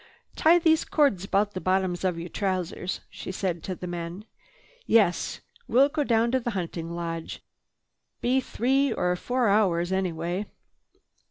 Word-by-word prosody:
"Tie 330 +2 +5
these 320 -2 +3
cords 280 - +2
about 205 +1 +1
the 185 - -4
bottoms 185 -1 0
of 180 -3 0
your 170 +1 -5
trousers," 185 -1 -2
she - - -7
said 180 -3 -2
to 185 - -4
the 180 - -7
men. 175 +3 -5 0.6
"Yes, 205 -6 +2 0.3
we'll 270 +4 +5
go 295 0 0
down 235 -2 +2
to 260 - +2
the 240 - -3
hunting 165 -2 -4
lodge. 165 -1 -5 0.8
Be 260 +2 +2
three 265 +3 +1
or 180 0 0
four 245 +5 0
hours 185 -4 +2
anyway." 180 +1 -2
190 Hz, 150 wpm, -26 LUFS, 175-240 Hz, 0.8 s, Tie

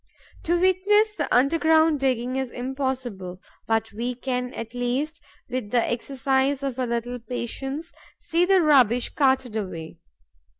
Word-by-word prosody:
To 345 +1 +2
witness 400 +4 +3
the - - -3
underground 315 +3 +4
digging 255 -1 0
is 265 -1 -1
impossible; 250 -8 -4 0.3
but 225 0 0
we 240 +3 -3
can, 250 0 -3
at 230 0 -6
least, 260 +7 -2 0.3
with 250 -4 -4
the 235 0 +2
exercise 265 +3 0
of 265 -2 -3
a 255 - 0
little 235 +1 -3
patience, 270 +6 -5 0.2
see 335 +2 0
the 375 -1 +4
rubbish 250 -5 +4
carted 265 -5 +1
away. 170 -7 -5
260 Hz, 135 wpm, -24 LUFS, 240-295 Hz, 0.3 s, underground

